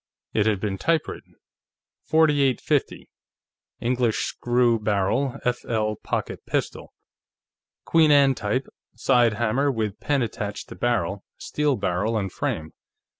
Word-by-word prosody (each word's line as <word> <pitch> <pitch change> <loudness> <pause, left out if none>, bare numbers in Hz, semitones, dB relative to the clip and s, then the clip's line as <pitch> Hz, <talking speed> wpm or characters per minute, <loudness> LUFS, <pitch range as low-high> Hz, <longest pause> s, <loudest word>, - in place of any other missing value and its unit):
It 105 -1 +2
had 105 -3 +1
been 95 -2 -3
typewritten: 165 -2 -2 0.7
4850: 145 -5 +2 0.7
English 120 -2 +1
Screw 120 -1 +1
Barrel 105 +6 0
F/L 110 -3 -1
Pocket - - -4
Pistol. - - -3 0.9
_Queen 160 -2 +4
Anne 140 -2 +6
type, 115 +3 -2 0.3
side 120 -4 +3
hammer 120 +6 +1
with 110 -4 -3
pan 140 -3 +1
attached 105 -2 -5
to - - -8
barrel, 100 -5 -1
steel 150 -2 0
barrel 100 +3 -1
and 95 -3 -2
frame. 80 -1 -3
115 Hz, 115 wpm, -24 LUFS, 105-135 Hz, 0.9 s, Anne